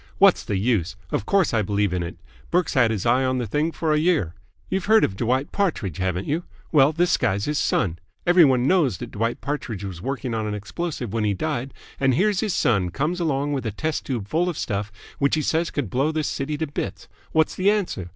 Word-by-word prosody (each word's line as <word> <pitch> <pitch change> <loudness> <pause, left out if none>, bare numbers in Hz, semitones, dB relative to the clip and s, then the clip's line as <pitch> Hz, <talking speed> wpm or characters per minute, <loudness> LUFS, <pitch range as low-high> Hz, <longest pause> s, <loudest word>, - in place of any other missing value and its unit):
"What's 195 -1 +5
the 100 - -2
use? 100 -3 0 0.2
Of - - -2
course 195 -8 +3
I 110 - +3
believe 100 -1 0
in 90 - 0
it. 85 0 -5 0.3
Burke's 180 -1 +1
had 130 -4 +4
his 110 -4 -2
eye 125 +3 +3
on 130 0 +1
the 125 - -1
thing 150 +9 0
for 160 -1 0
a 150 - +3
year. 155 - +1 0.3
You've 190 0 -2
heard 220 +1 +5
of 95 - +1
Dwight 130 +6 0
Partridge, 155 - -1
haven't 95 0 -1
you? 160 +4 -1 0.3
Well, 145 -2 +5
this 170 +3 +2
guy's 100 +2 0
his 150 0 0
son. 85 -3 0 0.3
Every 175 0 +6
one 130 -4 +4
knows 150 - +3
that - - -7
Dwight 115 +3 -2
Partridge 130 -8 -4
was 95 -4 -6
working 130 0 -3
on 110 -1 -1
an 105 - -2
explosive 120 - -4
when 115 -1 0
he 105 -2 +1
died, 135 +2 -2 0.3
and 130 -2 +3
here's 200 +4 +2
his 215 -4 0
son 100 -6 +2
comes 150 - -1
along 145 -3 0
with 135 - -2
a 110 - -2
test 155 +9 -2
tube 120 -7 -3
full 170 - +1
of 170 - -4
stuff 100 +1 -2 0.3
which 140 +2 +3
he 155 - -1
says 165 +3 +1
could 135 -10 -3
blow 135 +5 +1
this 155 -2 -1
city 145 +2 -2
to 160 - -1
bits. 100 - -5 0.2
What's 160 0 +2
the 190 +2 +2
answer? 185 - -1
135 Hz, 230 wpm, -23 LUFS, 105-160 Hz, 0.3 s, Every